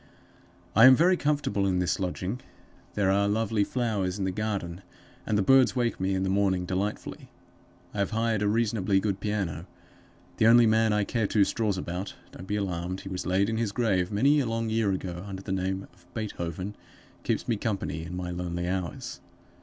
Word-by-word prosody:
"I 115 +4 +8
am 130 - +9
very 175 +6 +4
comfortable 145 - 0
in 95 -1 +1
this 90 +3 0
lodging. 95 +5 -3 0.5
There 100 -2 +2
are 100 +1 +2
lovely 105 0 +1
flowers 105 -6 -1
in 100 - -1
the 95 - 0
garden, 100 -4 -3 0.5
and 105 - +1
the 100 - +2
birds 135 +2 +5
wake 120 -2 0
me 95 +1 0
in 95 - 0
the - - 0
morning 95 -2 +1
delightfully. 95 +3 -4 0.6
I 105 - -4
have 100 - +1
hired 115 -1 0
a 105 - +2
reasonably 105 -3 +1
good 100 -1 -1
piano. 95 -5 -3 0.7
The 110 - +4
only 120 +1 +7
man 110 0 +3
I 105 0 +2
care 110 0 -1
two 105 -1 +3
straws 105 -1 0
about 90 +2 -4 0.2
don't 90 - -10
be 105 - -1
alarmed; 95 -2 -3
he 95 - -8
was 90 -1 -4
laid 95 +2 +2
in 110 0 -1
his 115 -3 -1
grave 100 -5 +1
many 140 +9 +4
a 130 - 0
long 115 0 -2
year 110 -3 +2
ago, 90 -2 -4
under 95 -1 -7
the 95 - -5
name 95 0 -1
of 90 0 -25
BEETHOVEN 95 -3 -4 0.5
keeps - - -1
me 115 - +1
company, 100 -7 -3
in 85 +2 -6
my 90 -1 -4
lonely 90 0 -3
hours. 90 -3 -4
100 Hz, 195 wpm, -27 LUFS, 95-110 Hz, 0.7 s, am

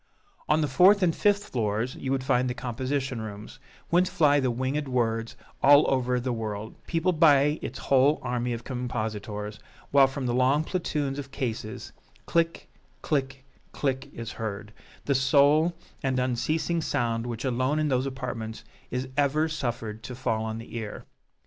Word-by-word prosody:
On 155 +1 +4
the 150 - +1
fourth 185 +8 +5
and 165 -3 +2
fifth 205 0 +2
floors 110 +1 -1
you 135 - -4
would 135 -1 0
find 125 -1 +2
the 125 - -3
composition 130 +1 -2
rooms, 110 +3 -8 0.3
whence 180 +2 +3
fly 150 -6 +4
the 130 -2 +1
winged 130 +4 -1
words 115 -2 -1 0.3
all 145 +2 +7
over 125 -1 +1
the 125 0 -2
world, 110 -1 -4
peopled 165 0 0
by 150 -2 +5
its - - -5
whole 140 +3 +3
army 125 0 -1
of 115 0 -4
compositors; 110 -4 -4 0.3
while 140 -1 +7
from 135 0 -5
the 120 - 0
long 130 +4 +3
platoons 150 -5 -2
of 135 -2 -6
cases, 115 -4 -5 0.3
"click 165 0 0 0.4
click 135 -2 -1 0.3
click" 135 0 -2
is 115 -1 -6
heard, 105 -1 -5 0.3
the 140 - +2
sole 145 +5 +4 0.3
and 130 -2 0
unceasing 155 +7 0
sound 115 -4 -1
which 120 +2 -4
alone 130 +3 +1
in 155 -1 +1
those 130 0 +1
apartments 125 -4 -5 0.3
is 125 +1 -3
ever 145 +2 +2
suffered 120 -7 -4
to 125 - -7
fall 115 -3 -1
on 110 0 -3
the 115 +1 -9
ear. 110 -2 -6
130 Hz, 160 wpm, -27 LUFS, 115-145 Hz, 0.4 s, all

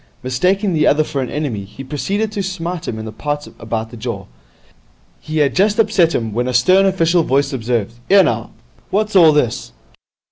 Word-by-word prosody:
Mistaking 185 - +1
the 155 -2 +2
other 155 +2 +4
for 145 -3 -3
an 125 - -3
enemy, 140 -9 -3
he 105 +7 -10
proceeded 195 - -2
to 210 -2 -3
smite 180 -2 -4
him 110 - -3
in 110 - -6
the 110 - -6
parts 145 +5 -4
about 115 0 -4
the 120 - -10
jaw. 110 -3 -5 0.9
He 155 0 -5
had 145 -3 +2
just 205 +3 +2
upset 195 -7 +3
him, 115 -3 -2
when 120 +3 -1
a 125 - -2
stern 185 +11 +5
official 175 -2 +2
voice 140 -1 +1
observed, 115 -3 -2 0.2
''Ere, 195 0 +7
now, - - -2 0.4
what's 215 +1 -1
all 165 -4 +7
this?' 125 - -1
150 Hz, 190 wpm, -18 LUFS, 120-185 Hz, 0.9 s, Ere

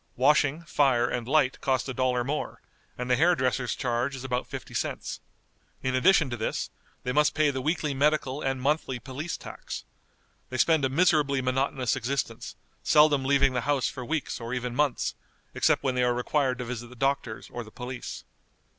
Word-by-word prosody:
Washing, 145 +4 +3
fire, 135 -7 +2
and 120 -1 -3
light 135 -2 +2
cost 130 -2 0
a 130 - -3
dollar 125 -1 +1
more, 145 +4 -3 0.4
and 125 - -3
the 125 - +4
hair 175 +6 +4
dresser's 130 -4 0
charge 125 +1 -1
is 130 - -7
about 125 -1 -2
fifty - - -8
cents. - - -3 0.6
In 130 - 0
addition 160 +4 +4
to - - -1
this, 110 - -2 0.3
they 125 - -1
must 150 +3 +3
pay 155 -1 +3
the 130 -1 -3
weekly 155 0 0
medical 145 0 +1
and 135 -1 -1
monthly 135 -1 0
police 135 +8 -5
tax. - - -8 0.6
They 130 - -4
spend 160 +2 +3
a 130 - +2
miserably 150 -2 +3
monotonous 130 -1 0
existence, 135 +1 -3 0.3
seldom 150 -2 +5
leaving 140 0 +3
the 125 - 0
house 140 -4 +1
for 130 - -7
weeks 150 -2 -3
or 115 +2 -3
even 125 -1 -3
months, 145 -3 +1 0.4
except - - +2
when 130 - +1
they 125 - 0
are 125 0 +2
required 130 +1 0
to 125 - -4
visit 120 0 -5
the 125 - -13
doctors 135 -3 -1
or 120 - -5
the 110 - -13
police. 125 +2 -7
130 Hz, 185 wpm, -27 LUFS, 125-145 Hz, 0.6 s, seldom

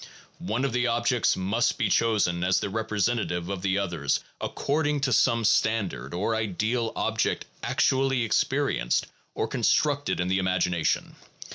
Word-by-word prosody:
One 110 +8 -2
of 135 - -2
the 125 0 +1
objects 120 0 +1
must 100 +6 0
be - - +1
chosen 100 -7 +1
as 90 +1 +2
the 100 - -4
representative 105 -4 -1
of 100 -2 -4
the 95 0 0
others 85 -8 -1 0.2
according 145 0 -1
to 135 -3 +1
some 115 0 +3
standard 100 - +1
or 100 +6 -1
ideal 110 +2 -1
object - - -1 0.2
actually 135 -1 +1
experienced - - 0 0.3
or - - -1
constructed 145 -1 +1
in 90 - 0
the 95 +1 +1
imagination. 90 -3 0
110 Hz, 140 wpm, -26 LUFS, 90-120 Hz, 0.3 s, some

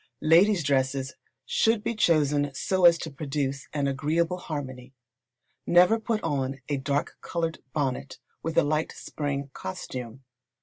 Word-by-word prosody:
Ladies' 175 +3 +5
dresses 135 -1 0 0.3
should 225 -1 +2
be 235 0 -1
chosen 150 -8 +2
so 185 -2 +1
as 170 -1 +8
to 160 - -6
produce 140 -1 -3
an 145 -2 -1
agreeable 160 +6 0
harmony. 130 -6 -6 0.7
Never 180 +6 +5
put 220 -1 -2
on 135 -1 -1
a 145 - -1
dark 140 +2 -2
coloured 165 -1 -3
bonnet 135 -1 -2 0.2
with 165 -1 -4
a - - +6
light 155 +2 0
spring 140 -2 -4
costume. 120 +6 -7
145 Hz, 135 wpm, -27 LUFS, 135-170 Hz, 0.7 s, as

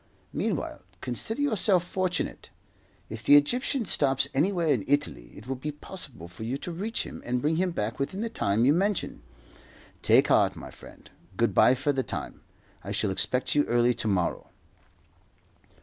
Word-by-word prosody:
Meanwhile, - - -2 0.2
consider 215 - -1
yourself 205 -8 +3
fortunate. 185 0 -3 0.6
If 110 0 -7
the 145 - +6
Egyptian 240 - +2
stops 140 -5 +2
anywhere 170 +3 +1
in 125 -9 +2
Italy, 135 - -1
it 105 - -11
will 135 +1 -3
be 150 +4 -4
possible 140 - -4
for 90 +5 -10
you 120 +4 -2
to 175 - -6
reach 210 +7 -2
him - - -9
and 125 +1 -1
bring 155 +5 0
him 185 +1 +1
back 115 -9 -3
within 190 +9 -3
the 230 - -1
time 115 - 0
you 140 - +5
mention. 195 +3 -1 0.8
Take - - +4
heart, - - +3
my - - -9
friend. - - -14 0.3
Good - - +2
bye 125 - +5
for 145 +3 0
the 135 - 0
time. - - -6 0.4
I - - -6
shall 100 - 0
expect 125 +6 +1
you 145 - +3
early 120 +1 +3
to 110 - -3
morrow." 95 -4 -1
145 Hz, 170 wpm, -27 LUFS, 120-180 Hz, 0.8 s, the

